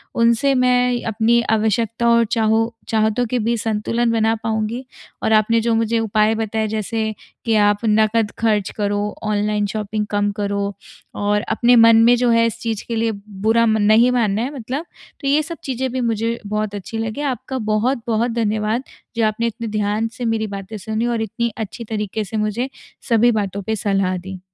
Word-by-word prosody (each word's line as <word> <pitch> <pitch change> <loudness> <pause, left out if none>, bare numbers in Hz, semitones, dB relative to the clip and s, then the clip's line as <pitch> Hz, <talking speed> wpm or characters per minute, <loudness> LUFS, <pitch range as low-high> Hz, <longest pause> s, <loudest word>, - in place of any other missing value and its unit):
उनसे 235 +4 +3
मैं 250 -1 +2
अपनी 225 +2 +2
आवश्यकता 225 +2 +1
और 235 0 +4
चाहो 225 0 +2 0.2
चाहतों 220 +2 +1
के 250 +2 -1
बीच 230 0 0
संतुलन 230 +2 0
बना 225 -1 +2
पाऊँगी 225 +3 -2 0.4
और 220 - +2
आपने 220 +2 +4
जो 230 0 +1
मुझे 225 0 +1
उपाय 215 0 +2
बताए, 220 0 -1
जैसे 220 +1 -2 0.3
कि, 225 -2 +2
"आप 205 -1 +3
नकद 215 0 +2
खर्च 210 -3 +1
करो, 205 0 -1
ऑनलाइन 210 -1 0
शॉपिंग 210 0 -3
कम 205 0 +1
करो 200 0 -1 0.4
और 205 0 +1
अपने 245 +1 +4
मन 230 -1 +7
में 240 +1 +6
जो 245 0 +2
है, 230 0 +4
इस 230 - -5
चीज़ 225 -3 -3
के 235 - -2
लिए 225 0 +1 0.3
बुरा 230 +1 +4
म 220 -1 +2
नहीं 220 +4 +5
मानना 220 -4 +1
है, 260 +5 -3
मतलब।" 265 +5 -4 0.3
तो 275 - -4
ये 290 +2 +3
सब 335 +2 -7
चीज़ें 260 -1 -2
भी 260 +1 -2
मुझे 230 0 -1
बहुत 210 0 -2
अच्छी 205 +3 -6
लगीं। 225 +6 -3
आपका 265 -1 -3 0.2
बहुत-बहुत 235 0 0
धन्यवाद, 220 +1 0 0.3
जो 230 -1 +2
आपने 215 +2 0
इतने 230 0 -5
ध्यान 210 +2 0
से 245 - -3
मेरी 225 -1 0
बातें 200 +1 -7
सुनी 220 +2 -2
और 235 -2 -1
इतनी 235 +2 -2
अच्छी 220 +1 -5
तरीके 215 -1 -3
से 210 +2 -5
मुझे 215 +5 -1 0.4
सभी 235 +1 +4
बातों 200 0 -4
पे 220 +3 -1
सलाह 195 -3 0
दी। 190 +1 -8
220 Hz, 185 wpm, -20 LUFS, 210-235 Hz, 0.4 s, मन